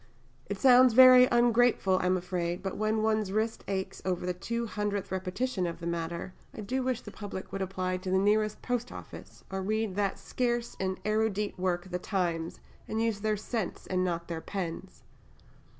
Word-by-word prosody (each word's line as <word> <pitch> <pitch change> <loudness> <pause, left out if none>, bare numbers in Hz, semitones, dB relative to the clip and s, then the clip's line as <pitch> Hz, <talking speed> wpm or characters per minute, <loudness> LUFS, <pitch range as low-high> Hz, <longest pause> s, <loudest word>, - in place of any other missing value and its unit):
It 200 - -3
sounds 250 -1 +6
very 255 0 +9
ungrateful, 240 -5 +3
I 180 - 0
am 185 0 +3
afraid, 175 -1 -3
but 190 - -3
when 215 +1 0
one's 215 -3 +1
wrist 220 +2 -1
aches 190 -1 -3
over 180 -1 -1
the 180 - 0
two 235 +6 -3
hundredth 205 -3 -3
repetition 190 +2 -2
of 170 - -5
the 170 - -7
matter, 170 +1 -3 0.2
I - - -6
do 255 +6 -2
wish 255 -2 -1
the - - -10
public 200 -3 -7
would 195 - -4
apply 185 -1 -2
to 185 +1 -6
the 190 - +3
nearest 210 +2 +1
post 245 -1 -2
office, - - -11
or 190 0 -2
read 215 +1 -1
that 200 -2 0
scarce 240 -1 -2
and 190 0 -2
erudite 215 -2 0
work 180 0 -1
the 180 - -2
Times, 170 -4 -2 0.3
and 220 - -2
use 225 -2 0
their 215 0 0
sense 215 -1 -4
not 180 -2 0
their 165 -1 -4
pens. 185 0 -6
195 Hz, 180 wpm, -29 LUFS, 185-220 Hz, 0.3 s, very